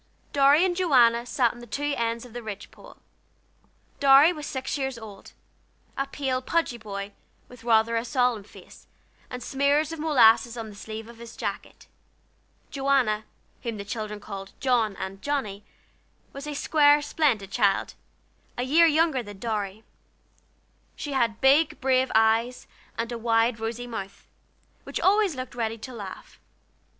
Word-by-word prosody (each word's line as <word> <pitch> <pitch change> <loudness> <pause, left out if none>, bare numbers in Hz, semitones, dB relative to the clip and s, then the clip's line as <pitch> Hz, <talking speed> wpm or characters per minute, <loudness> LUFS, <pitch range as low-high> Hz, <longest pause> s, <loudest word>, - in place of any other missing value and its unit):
Dorry 285 +4 +5
and 360 -2 0
Joanna 245 -9 +3
sat 245 -2 +1
on 240 - -13
the 240 - -11
two 290 +5 -2
ends 230 0 -2
of 240 - -14
the 240 - -6
ridge 205 -3 -8
pole. - - -15 1.0
Dorry 280 +4 +7
was 300 -3 -7
six 265 -1 -3
years 265 -3 -3
old; 210 -3 -12 0.6
a 275 - -2
pale, 265 -2 -2
pudgy 260 -4 -1
boy, 200 -2 -6 0.3
with 245 -2 -15
rather 230 0 +3
a 230 - 0
solemn 245 -3 0
face, - - -16 0.4
and 250 0 -6
smears 285 +3 +1
of 325 - -6
molasses 240 -6 +4
on 225 -1 -6
the - - -13
sleeve 220 +2 -8
of 235 -1 -14
his 235 0 -11
jacket. - - -6 0.9
Joanna, 270 -6 +1 0.4
whom 230 -3 -4
the 200 - -7
children 210 -1 -5
called 195 -2 -8
"John," 235 -6 +1
and 190 +1 -7
"Johnnie," 215 -9 -3 0.7
was 280 +2 -8
a 295 - -4
square, 290 0 +4
splendid 260 -10 0
child, 195 0 +1 0.6
a 245 - -1
year 320 +6 +5
younger 315 -4 +2
than 205 -3 -10
Dorry; 210 -1 -4 1.1
she 290 - -6
had 230 -4 0
big 280 +4 +4
brave 260 0 +2
eyes, 225 +3 +2 0.3
and 230 +1 -3
a 235 - -4
wide 230 0 +2
rosy 230 +2 -4
mouth, 200 -5 -7 0.6
which - - -5
always 400 -4 +3
looked 255 +1 -6
ready 225 -2 -2
to 255 +3 -9
laugh. 200 -5 -9
240 Hz, 155 wpm, -26 LUFS, 220-275 Hz, 1.1 s, Dorry